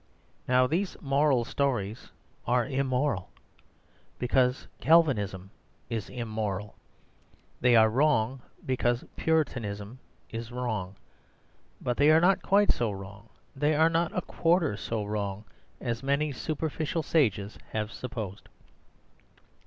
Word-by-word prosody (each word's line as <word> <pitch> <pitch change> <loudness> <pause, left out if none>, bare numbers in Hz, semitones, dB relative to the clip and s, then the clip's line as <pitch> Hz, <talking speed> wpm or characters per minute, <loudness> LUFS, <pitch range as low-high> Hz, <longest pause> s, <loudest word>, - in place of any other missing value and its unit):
Now 125 0 +4
these 175 +8 -1
moral 140 -3 +2
stories 120 -6 -2 0.4
are 120 -1 +3
immoral, 130 -5 -1 0.9
because 125 +1 +1
Calvinism 105 - +3 0.4
is 110 -3 -3
immoral. 110 -4 -3 0.9
They 125 -1 +4
are 110 -1 +7
wrong, 130 0 +2 0.2
because 120 -2 0
Puritanism 120 -8 -1 0.3
is 115 +1 -6
wrong. 110 -6 -3 0.8
But 120 -1 -2
they 145 +2 +5
are 155 +1 +7
not 190 +3 +4
quite 205 +1 +4
so 120 -2 0
wrong, 100 +2 -9 0.3
they 150 +3 +2
are 160 +2 +4
not 165 0 +1
a 180 - 0
quarter 165 - +1
so 110 0 -3
wrong, 100 0 -3 0.3
as 120 -1 -3
many 140 +2 +1
superficial 155 +2 -2
sages 110 - +1
have 110 0 -3
supposed. 110 -7 -6
125 Hz, 115 wpm, -28 LUFS, 110-150 Hz, 0.9 s, are